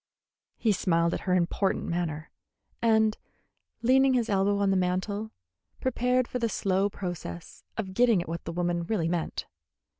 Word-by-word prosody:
He 225 - +2
smiled 170 -3 +2
at - - -1
her 180 - +4
important 185 +2 +1
manner, 165 -3 -3 0.5
and, 220 -1 +3 0.7
leaning 265 +2 +5
his 235 -2 +1
elbow 200 0 +2
on 200 -1 +2
the - - +2
mantel, 190 +4 -1 0.5
prepared 250 0 +1
for 250 - -3
the 230 -1 0
slow 195 -1 +1
process 175 -3 -7
of 195 -4 -3
getting 235 -2 +4
at 175 - -4
what 165 +1 -5
the 170 - -3
woman 175 0 0
really 180 -4 0
meant. 170 -1 -2
195 Hz, 155 wpm, -28 LUFS, 175-225 Hz, 0.7 s, leaning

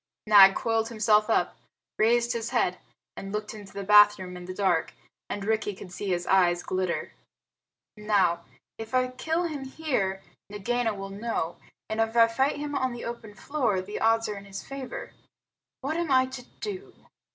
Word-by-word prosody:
Nag 200 -2 +8
coiled 225 0 0
himself 215 -1 +3
up, - - +1 0.4
raised 235 +2 +3
his 230 0 -3
head, 185 -8 0 0.4
and 195 - -7
looked 210 +1 -4
into 205 -3 -11
the 200 - -6
bathroom 205 -2 +5
in 180 0 -8
the 185 - -6
dark, 185 -5 +1 0.3
and 200 -1 -4
Rikki 215 -2 0
could 185 -1 -11
see 200 +3 -5
his 175 -2 -1
eyes 175 -2 +3
glitter. 185 -2 -2 0.8
"Now, 195 -5 +1 0.4
if 225 +2 -5
I 255 0 +2
kill 320 +7 -1
him 305 -5 -4
here, 250 -10 -2 0.3
Nagaina 225 +2 -1
will 195 0 -7
know; 200 -5 -3 0.3
and 220 +1 -1
if 225 +1 -1
I 230 -1 +8
fight 265 +6 0
him 295 0 -4
on 260 -3 0
the 240 - -7
open 230 -3 -7
floor, 240 -3 -1
the 195 +3 -5
odds 225 0 +3
are 210 - -4
in 200 - -10
his 195 0 -7
favor. 275 - -7 0.7
What 290 +4 -2
am 340 -2 -1
I 260 -1 +5
to 260 -1 -8 0.2
do?" 400 -2 -6
220 Hz, 175 wpm, -27 LUFS, 195-255 Hz, 0.8 s, Nag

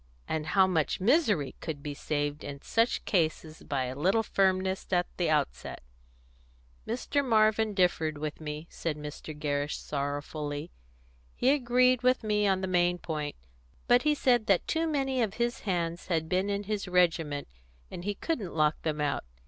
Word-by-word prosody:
And 155 -1 -2
how 190 +4 +5
much 165 -5 0
misery 210 - +2
could 145 -3 -5
be 145 - -4
saved 145 0 -2
in 140 -1 -6
such 230 +2 +1
cases 160 -4 0
by 140 -2 -2
a 125 0 -3
little 190 +11 +2
firmness 190 -2 0
at 180 -1 +3
the 175 - +1
outset!" 65 - -1 1.0
"Mr. 255 +5 0
Marvin 220 -3 +3
differed 165 -5 +1
with 150 +1 -5
me," 150 +1 -5
said 160 -3 -3
Mr. 150 +1 -8
Gerrish 145 0 -1
sorrowfully. 145 +1 -4 0.6
"He 255 - +3
agreed 250 -2 +3
with 255 -1 +2
me 210 -1 +2
on 190 -1 +2
the 190 - -2
main 175 -1 +2
point, 150 -4 -4 0.5
but 245 +1 +5
he 300 0 +2
said 245 -5 +2
that 195 -3 +3
too 325 0 +1
many 270 -4 0
of 215 -3 -1
his 240 0 -1
hands 170 -1 -1
had 160 -3 0
been 185 +4 0
in 200 0 -1
his 205 -1 -3
regiment, 165 -5 +1 0.4
and 175 - -7
he 205 +1 -2
couldn't 215 - -3
lock 155 -1 +2
them 155 -2 -2
out. 145 - 0
180 Hz, 165 wpm, -29 LUFS, 150-215 Hz, 1.0 s, how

